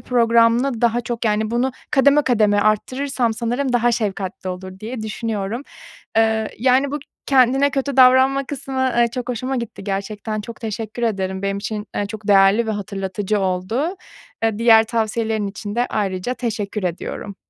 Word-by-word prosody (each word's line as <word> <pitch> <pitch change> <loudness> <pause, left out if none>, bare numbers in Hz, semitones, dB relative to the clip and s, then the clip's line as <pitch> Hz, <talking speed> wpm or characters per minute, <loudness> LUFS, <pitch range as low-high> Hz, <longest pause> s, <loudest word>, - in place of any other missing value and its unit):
programlı 235 +1 +2
daha 235 0 +2
çok, 235 0 -4
yani, 215 0 +1
bunu 245 +3 0 0.2
kademe 285 +1 +4
kademe 215 -6 +3
arttırırsam 240 +3 0
sanırım 245 +4 -1
daha 240 0 +3
şefkatli 195 -4 -3
olur 185 +1 -8
diye 225 +1 -5
düşünüyorum. 220 +1 -3 0.6
Iıı, 220 -1 +2
yani, 260 +3 +3
bu 295 - -1 0.3
kendine 270 +1 +4
kötü 275 0 -2
davranma 260 +1 +5
kısmı, 270 -1 -5 0.2
ııı, 235 0 +4
çok 250 +1 -5
hoşuma 255 +2 -2
gitti 235 -4 -6
gerçekten, 210 +2 -3
çok 225 +2 -9
teşekkür 225 +1 -5
ederim. 190 -4 -1
Benim 200 0 -1
için, 210 +1 -4
ııı, 205 - 0
çok 210 0 -8
değerli 200 +3 +5
ve - - -1
hatırlatıcı 200 0 -2
oldu. 195 - -1 0.5
Iıı, 220 -2 +1
diğer 225 -1 +6
tavsiyelerin 220 -2 -1
için 205 +1 -6
de 240 +1 +1
ayrıca 195 +3 -2
teşekkür 215 -4 -3
ediyorum. 185 +3 -4
225 Hz, 155 wpm, -20 LUFS, 205-250 Hz, 0.6 s, diğer